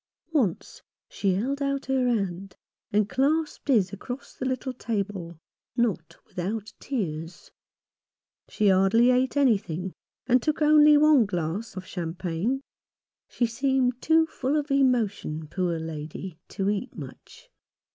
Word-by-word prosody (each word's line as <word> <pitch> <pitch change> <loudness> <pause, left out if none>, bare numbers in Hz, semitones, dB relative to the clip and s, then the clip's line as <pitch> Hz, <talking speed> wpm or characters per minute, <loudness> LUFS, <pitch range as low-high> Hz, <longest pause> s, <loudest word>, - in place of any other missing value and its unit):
Once 230 - -1 0.3
she 195 -2 0
held 270 +8 -2
out 275 -1 -1
her 265 -1 +1
hand 195 -5 -2 0.4
and 210 0 +2
clasped 295 +7 0
his 210 -9 +3
across 245 +6 -7
the - - -5
little 260 0 -2
table 200 -8 -4 0.2
— - - -42
not 165 -8 -4
without 205 +4 -4
tears. 170 - -4 1.0
She 210 -1 +2
hardly 195 +6 +5
ate 255 +2 +1
anything, 195 - +1 0.3
and 250 0 +4
took 305 +4 0
only 300 0 +7
one 295 -6 +5
glass 180 +4 -3
of 185 - -6
cham 170 -3 -5
pagne. 190 +9 -2 0.7
She 240 - 0
seemed 255 +1 0
too 320 0 +4
full 285 -3 -2
of 295 -1 -1
emotion, 220 - +1
poor 175 0 -1
lady, 160 +2 -6
to 195 -1 -3
eat 210 +5 -4
much. - - -11
225 Hz, 135 wpm, -26 LUFS, 185-265 Hz, 1.0 s, only